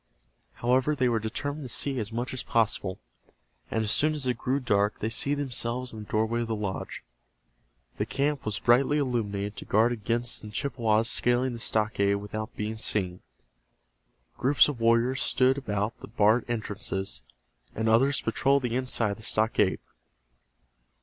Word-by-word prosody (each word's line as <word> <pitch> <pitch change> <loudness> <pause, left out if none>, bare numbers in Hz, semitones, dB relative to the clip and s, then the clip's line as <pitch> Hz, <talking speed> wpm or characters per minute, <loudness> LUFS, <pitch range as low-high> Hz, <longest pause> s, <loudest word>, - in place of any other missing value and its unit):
However, 130 +5 +1
they 130 -2 +2
were 115 -2 +1
determined 145 +7 -4
to - - -7
see 135 -3 0
as 105 0 -4
much 120 +3 -3
as 130 - -3
possible, 100 -4 0 0.7
and 110 - 0
as 105 - -2
soon 155 +1 +3
as 145 -3 -3
it 125 -1 +1
grew 130 +4 -1
dark 105 -5 +1
they 110 - -3
seated 140 +4 0
themselves 125 -1 -3
in 110 - -7
the 105 - -8
doorway 110 +2 0
of 115 - -2
the 110 - -1
lodge. 100 -3 -5 0.9
The - - -1
camp 140 0 -1
was 105 -1 -2
brightly 130 +6 +3
illuminated 105 -7 -2
to - - -7
guard 110 +3 +3
against 120 +1 -1
the 105 - -9
Chippewas 115 -2 0
scaling 120 +1 +2
the 115 - -7
stockade 105 -3 +1
without 110 +3 -5
being 110 +1 -3
seen. 95 -5 0 1.2
Groups 135 +4 +5
of 145 -5 -4
warriors 115 +3 +2
stood 130 +1 +3
about 105 -3 -2
the - - -10
barred 110 +2 +3
entrances, 95 - -3 0.5
and 110 +1 -1
others 130 +5 +3
patrolled 135 +4 +1
the 120 -1 -1
inside 125 -4 +1
of 100 - -5
the - - -13
stockade. 110 -3 +1
115 Hz, 165 wpm, -27 LUFS, 105-130 Hz, 1.2 s, Groups